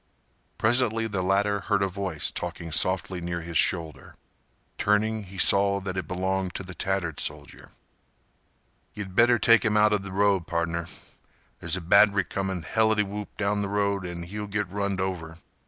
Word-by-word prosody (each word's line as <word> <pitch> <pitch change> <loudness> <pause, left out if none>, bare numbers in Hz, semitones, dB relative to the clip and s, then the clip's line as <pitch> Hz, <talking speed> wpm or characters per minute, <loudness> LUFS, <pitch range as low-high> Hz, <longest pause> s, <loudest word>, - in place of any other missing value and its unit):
Presently 115 0 +2
the 100 -4 -2
latter 100 +2 +1
heard 100 0 0
a - - +1
voice 95 -4 -3
talking 85 -1 -6
softly 90 +2 0
near 85 0 -4
his 85 0 -8
shoulder. 80 -3 0 0.6
Turning 110 +1 +1
he 95 +1 -12
saw 100 +1 +5
that 95 -1 -5
it 95 - -4
belonged 95 0 -2
to - - -4
the 95 0 -9
tattered 90 -5 -2
soldier. 75 -1 -4 1.3
"Ye'd 100 -3 -6
better 120 +4 +5
take 115 0 +4
'im 105 -2 +1
outa 105 -1 +4
th' 95 0 -8
road, 100 -2 +1
pardner. 85 0 -2 0.7
There's 85 +2 -1
a - - -5
batt'ry 100 +3 +4
comin' 95 -3 -3
helitywhoop 105 +1 0
down 105 0 0
th' 100 - -2
road 100 -1 0
an' 90 -1 -6
he'll 105 +4 -6
git 105 -1 -2
runned 100 0 -2
over. 85 -4 -4
95 Hz, 160 wpm, -26 LUFS, 90-105 Hz, 1.3 s, saw